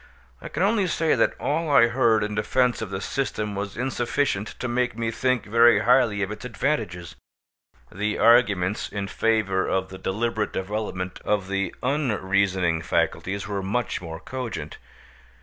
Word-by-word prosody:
I - - -7
can - - -1
only 205 -1 +2
say 165 -2 +1
that - - +1
all 160 +2 -1
I 140 -5 +6
heard 115 -3 +2
in 105 0 -3
defence 125 +4 +1
of 110 - -4
the 95 -1 -4
system 105 -3 -2
was 100 0 -5
insufficient 120 -3 -1
to 125 - -3
make 120 -1 -1
me 115 -1 -1
think 130 +1 0
very 115 +2 +5
highly 120 -5 +3
of 95 - -3
its 105 +2 -7
advantages. 110 - -2 0.8
The 105 +2 -2
arguments 105 -5 +3
in 100 -1 -4
favour 105 -4 +1
of 95 0 -1
the 95 0 -9
deliberate 110 +2 -2
development 95 -2 -4
of 100 -3 0
the 100 0 -2
unreasoning 100 - +1
faculties 95 +4 -1
were 100 -2 -2
much 105 +4 -2
more 80 -2 -7
cogent. 120 - -6
105 Hz, 155 wpm, -24 LUFS, 95-125 Hz, 0.8 s, I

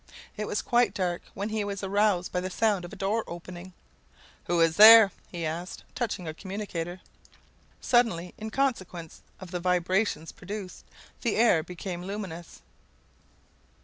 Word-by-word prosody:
It 210 -1 -4
was 210 - -2
quite 240 -4 +2
dark 180 -2 -1
when 200 +2 -3
he 215 -1 -1
was 200 -1 -5
aroused 195 -2 +1
by 180 - 0
the 185 - -3
sound 200 -2 +1
of 175 - -10
a - - -8
door 210 +4 -1
opening. 175 +1 -9 0.7
"Who 175 -1 0
is 165 -1 +3
there?" 220 -1 +10 0.2
he 170 -2 -4
asked, 170 +3 -5
touching 210 -8 -3
a 155 - -4
commutator. 185 -2 -5 0.8
Suddenly, 205 -8 +1
in 220 +1 -5
consequence 190 - -2 0.2
of 185 -2 -10
the 180 - -2
vibrations 180 -1 0
produced, 195 0 -8 0.4
the 235 - 0
air 225 -8 +4
became 175 +1 -6
luminous. 185 -3 -7
185 Hz, 145 wpm, -27 LUFS, 175-210 Hz, 0.8 s, there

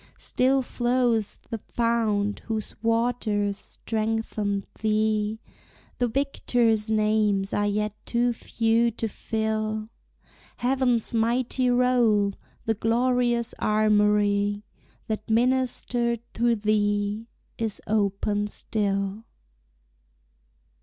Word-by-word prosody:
Still 265 +1 +1
flows 240 -3 0
the 225 - -3
fount 220 -3 0
whose 220 -2 -3
waters 225 -3 +1
strengthened 215 -2 -2
thee; 215 0 +1 0.6
The 245 - +2
victors' 235 -4 +1
names 215 -2 +2
are 205 0 +1
yet 210 0 -1
too 240 0 +1
few 230 +1 +1
to 230 0 -3
fill 215 0 -2 0.7
Heaven's 245 -2 +1
mighty 245 +2 +1
roll; 240 -5 +3 0.3
the 225 - +2
glorious 240 +1 +1
armory, 210 -1 +2 0.4
That 215 0 -4
ministered 240 0 +1
to 235 0 +2
thee, 205 0 0 0.3
is 225 -3 -2
open 205 0 0
still. 200 0 -2
220 Hz, 85 wpm, -26 LUFS, 210-235 Hz, 0.7 s, roll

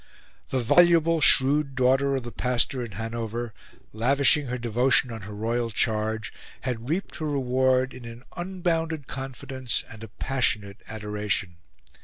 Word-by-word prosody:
The - - -1
voluble, 165 +4 +4
shrewd 140 0 +5
daughter 135 +2 +2
of 130 - -2
the 120 - -7
pastor 125 +1 0
in 115 -4 -8
Hanover, 115 +2 -4 0.4
lavishing 140 +5 +3
her 125 0 -3
devotion 125 +2 +2
on 115 -1 -6
her 105 +2 -9
royal 115 +2 -1
charge, 110 0 -1 0.3
had 125 -1 -4
reaped 170 0 -2
her 155 -1 -3
reward 130 -1 +1
in 125 -2 -10
an 115 +1 -10
unbounded 170 -4 -2
confidence 130 -2 -4
and 110 0 -11
a - - -7
passionate 105 -3 -1
adoration. 105 -4 -3
125 Hz, 140 wpm, -26 LUFS, 115-140 Hz, 0.4 s, shrewd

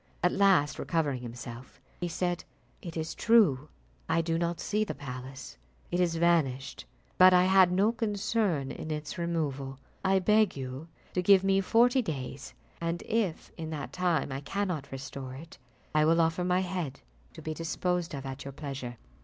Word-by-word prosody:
At 180 - +4
last 195 -7 +3
recovering 145 -7 0
himself, 120 +1 -9 0.2
he 175 - -2
said, 175 +1 -2 0.4
"It 170 -2 -7
is 160 0 -3
true, 160 - +4 0.4
I 165 - +3
do 165 0 -1
not 170 0 -1
see 210 +1 0
the 215 - -4
palace. 130 - -8 0.3
It 175 - 0
is 175 -2 +2
vanished; 155 -6 +1 0.3
but 185 0 +9
I 180 - +6
had 190 -1 +6
no 195 +5 +3
concern 205 - 0
in - - -7
its 150 +1 -4
removal. 145 -6 -2 0.3
I 190 0 +3
beg 210 -1 +3
you 130 +4 -6 0.3
to 180 - +1
give 190 +1 +6
me 195 0 +3
forty 240 +6 +4
days, 140 - -5 0.3
and 170 0 -2
if 210 -7 -1
in 160 -1 -5
that 155 -2 -5
time 175 -6 0
I 135 +1 -4
cannot 180 -2 -3
restore 130 -1 -6
it, 160 +5 -11 0.3
I 155 0 +4
will 165 +2 +4
offer 165 +2 +2
my 180 +1 +2
head 175 -7 -4 0.3
to 160 - -11
be 155 - -3
disposed 170 +1 -2
of 135 -1 -6
at 135 0 -6
your 140 - -7
pleasure." 135 -4 -6
165 Hz, 170 wpm, -29 LUFS, 140-185 Hz, 0.4 s, but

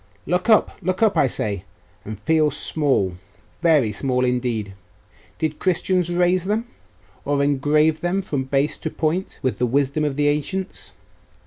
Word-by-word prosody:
'Look 180 +7 -1
up! 220 - +3
look 185 +4 -1
up, 210 -3 +3
I 150 -4 +4
say, 100 -6 -1 0.4
and 105 -1 -7
feel 155 +7 +2
small 135 - 0 0.4
very 155 -10 +3
small 125 +4 0
indeed! 120 -5 -1 0.6
Did 155 -1 -2
Christians 180 -1 +1
raise 180 +1 +2
them, 215 +4 -1 0.6
or 140 -1 +1
engrave 150 +3 +2
them 185 +3 0
from 140 -7 -2
base 140 +2 0
to 160 - -3
point 160 +5 -2
with 130 - -1
the 125 - +2
wisdom 140 +4 0
of 145 -2 -1
the 145 +1 +1
ancients? 165 +6 -3
150 Hz, 150 wpm, -22 LUFS, 130-175 Hz, 0.6 s, I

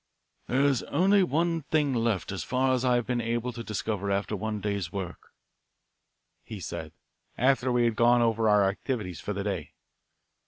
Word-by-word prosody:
"There 130 +3 +2
is 140 -4 +3
only 195 +6 +4
one 170 -1 +1
thing 150 -1 +1
left 115 -6 0
as 100 - -4
far 130 0 +1
as 130 -1 0
I 125 -1 +3
have 120 -1 0
been 125 -1 -1
able 120 +2 -2
to 115 0 -6
discover 105 -2 -3
after 100 +2 -1
one 105 +1 -3
day's 100 -4 -2
work," 95 -3 -6 1.2
he - - -8
said, - - -6 0.5
after 130 0 +2
we 120 0 +3
had 115 -2 +1
gone 120 +1 +4
over 115 -1 +2
our 105 -2 +5
activities 100 - -3
for 105 - -4
the 100 0 -3
day. 95 -7 -4
115 Hz, 175 wpm, -28 LUFS, 100-130 Hz, 1.2 s, our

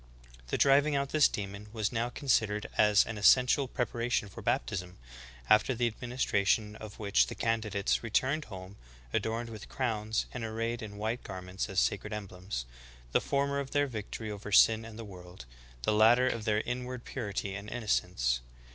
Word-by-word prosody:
''The - - -1
driving 145 +2 +4
out 140 0 0
this 155 -1 +5
demon 100 +1 -6
was 110 -2 -1
now 120 0 -1
considered 110 -6 +1
as 105 -1 +5
an 110 -2 -5
essential 125 +6 +5
preparation 120 -3 -1
for - - -10
baptism, 90 +8 -2 0.5
after 110 - +4
the 120 0 +1
administra 120 -3 -1
tion 105 0 +2
of 110 -2 -10
which 105 -2 +3
the - - -6
candidates 110 -3 0
returned 130 +7 0
home, 95 -1 -10 0.4
adorned 115 +1 -1
with 110 -2 -9
crowns, 110 -4 -1
and 120 - -4
arrayed 115 +2 -2
in 105 -2 -7
white 110 +3 -2
garments, 95 +2 -5
as 95 -1 +1
sacred 105 +1 0
emblems, 95 - -5 0.2
— - - -22
the - - +3
former 140 0 0
of 140 -1 -4
their 145 - +4
victory 110 -3 -5
over 105 0 -7
sin 110 +2 +6
and 110 -1 -10
the 115 - -7
world; 90 -7 -11 0.4
the 105 - +2
latter 115 +4 +5
of 115 -4 -2
their 105 0 +2
inward 125 0 -5
purity 100 -5 -4
and 100 +2 -6
innocence." 90 - 0
110 Hz, 175 wpm, -31 LUFS, 100-120 Hz, 0.5 s, sin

